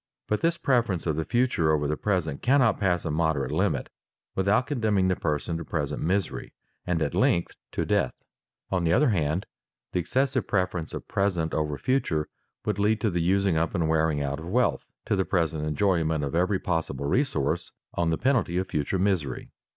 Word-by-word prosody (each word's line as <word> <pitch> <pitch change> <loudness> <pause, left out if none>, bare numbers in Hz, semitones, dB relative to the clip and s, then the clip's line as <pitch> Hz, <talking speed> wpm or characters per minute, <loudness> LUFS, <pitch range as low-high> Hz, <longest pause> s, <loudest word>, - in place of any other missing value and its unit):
But 105 - 0
this 170 0 +2
preference 120 - +1
of 80 -3 0
the 80 +1 -2
future 120 -10 +2
over 75 -1 +1
the 75 - 0
present 85 -6 -1
cannot 130 -3 +3
pass 90 -3 +1
a 80 - -1
moderate 80 -3 0
limit - - 0 0.5
without 100 +6 +2
condemning 110 -9 +1
the 90 - +2
person 80 +1 -2
to 85 - -5
present 75 -2 -3
misery, 95 +4 -1 0.3
and 85 -2 +1
at 70 - -2
length 85 - +2 0.2
to - - -1
death. - - +1 0.6
On 95 -2 +1
the 85 0 +2
other 140 +5 +4
hand 85 -2 0 0.5
the 90 - 0
excessive 130 +10 0
preference 90 -4 -1
of - - -7
present 90 -5 0
over 75 -2 -1
future 80 - 0 0.4
would 105 -1 -1
lead 105 +2 +2
to 110 - +1
the 85 -1 0
using 95 0 +2
up 85 +4 0
and 85 -4 +1
wearing 80 -2 +1
out 70 +1 -2
of 80 - -8
wealth, 120 +7 +1 0.2
to - - +1
the 95 - +2
present 80 -5 0
enjoyment 80 -1 +1
of 70 - -3
every 90 +4 +2
possible 80 -7 -2
resource, 80 - 0 0.2
on 85 -1 0
the 80 - +1
penalty 125 -10 +1
of 95 +1 0
future 75 +3 -1
misery. 90 -9 -1
85 Hz, 190 wpm, -27 LUFS, 80-100 Hz, 0.6 s, other